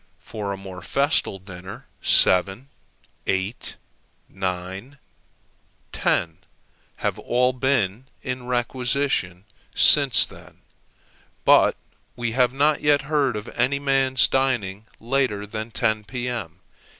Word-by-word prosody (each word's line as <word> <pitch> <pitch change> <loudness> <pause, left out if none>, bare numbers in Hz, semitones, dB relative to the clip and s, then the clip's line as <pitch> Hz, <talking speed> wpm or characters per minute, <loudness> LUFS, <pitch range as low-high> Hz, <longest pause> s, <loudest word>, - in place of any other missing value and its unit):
For 105 -2 -6
a 100 - -4
more 95 -1 -10
festal 140 - +1
dinner, 95 -1 -11 0.2
seven, 95 +8 +3 0.6
eight, 95 +4 -3 0.5
nine, 95 +8 -5 0.9
ten, 80 -2 -1 0.6
have - - -3
all 125 +1 +1
been 125 -4 0 0.2
in 125 -1 -5
requisition 120 -6 -1 0.3
since 140 -7 +6
then; - - -16 0.8
but - - +5 0.4
we 120 -1 -3
have 125 +1 +2
not 145 +3 +1
yet 145 -1 +3
heard 140 -4 0
of 105 +2 -6
any 125 +4 0
man's 135 -2 +2
dining 115 -6 -1
later 120 -4 -1
than 110 +2 -6
10, 110 -2 -1
P.M. 115 -7 -5
120 Hz, 105 wpm, -23 LUFS, 100-135 Hz, 0.9 s, since